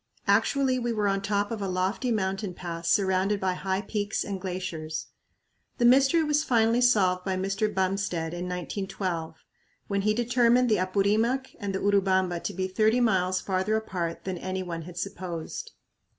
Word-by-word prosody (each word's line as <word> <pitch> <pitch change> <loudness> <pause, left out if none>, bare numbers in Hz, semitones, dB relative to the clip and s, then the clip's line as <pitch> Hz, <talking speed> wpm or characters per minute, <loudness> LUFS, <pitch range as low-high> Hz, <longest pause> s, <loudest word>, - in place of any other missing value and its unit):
Actually 265 -2 +2
we 240 -1 -1
were 210 -2 0
on 195 0 +1
top 205 +1 -1
of 225 -2 -3
a 195 - -1
lofty 190 +7 -1
mountain 195 -2 -1
pass 170 -1 -4
surrounded 190 +2 +2
by 190 -1 0
high 190 +1 -2
peaks 205 -1 -2
and 195 -2 -5
glaciers. 175 -4 -4 0.7
The 240 - +2
mystery 270 +6 +5
was 300 0 +2
finally 235 -3 +3
solved 190 -7 +3
by 190 -1 -1
Mr. 195 +3 -1
Bumstead 190 -4 -1
in 175 +1 -4
1912, 180 -3 -4 0.4
when 200 -1 0
he 215 +1 +1
determined 240 +1 +3
the 215 - +3
Apurimac 210 +8 +1
and 200 -3 -3
the - - -1
Urubamba 190 -3 +2
to - - -1
be 185 0 -1
thirty 215 +5 +2
miles 185 -5 +2
farther 190 +2 0
apart 180 -6 -3
than 185 -2 -4
any 185 +1 -3
one 170 -2 -5
had 175 +2 -10
supposed. 175 - -5
195 Hz, 165 wpm, -27 LUFS, 185-220 Hz, 0.7 s, mystery